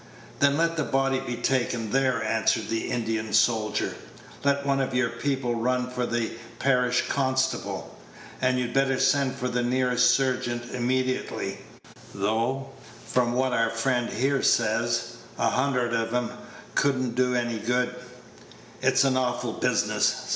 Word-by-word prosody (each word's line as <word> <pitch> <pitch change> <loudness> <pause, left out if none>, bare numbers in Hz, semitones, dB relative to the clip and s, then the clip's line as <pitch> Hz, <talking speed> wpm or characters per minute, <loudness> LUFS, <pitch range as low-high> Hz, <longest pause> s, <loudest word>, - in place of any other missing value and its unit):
"Then 140 0 +4
let 165 0 +1
the 150 - +1
body 135 -1 +1
be 125 -2 -4
taken 120 -3 -1
there," 130 -1 +1
answered - - +1
the 115 0 -2
Indian 110 -2 -2
soldier; 110 -1 +2 0.5
"let 140 0 +1
one 135 -1 +2
of 130 -1 -2
your 125 -2 +2
people 130 0 -1
run 125 +2 0
for 125 -1 -2
the 120 -1 -1 0.3
parish 125 -2 +2
constable; 130 -1 -1 0.5
and 130 0 +2
you'd 120 -1 -2
better 135 -1 +2
send 140 -3 +2
for 125 - -3
the 125 0 -1
nearest 125 0 +2
surgeon 125 -2 0
immediately, 130 +1 -1 0.6
though, 115 +7 -1 0.3
from 120 -1 +1
what 130 0 +1
our 115 -1 +2
friend 120 +1 0
here 135 +4 0
says, - - +1 0.2
a - - +2
hundred 125 -3 0
of 115 -1 0
'em 125 0 -1 0.4
could 140 -1 +2
n't 125 -2 -2
do 125 0 +1
any 120 -2 -1
good. 125 +2 0 0.9
It's - - +4
an 135 -1 +2
awful 125 -2 -1
business. - - 0
125 Hz, 145 wpm, -26 LUFS, 120-130 Hz, 0.9 s, Then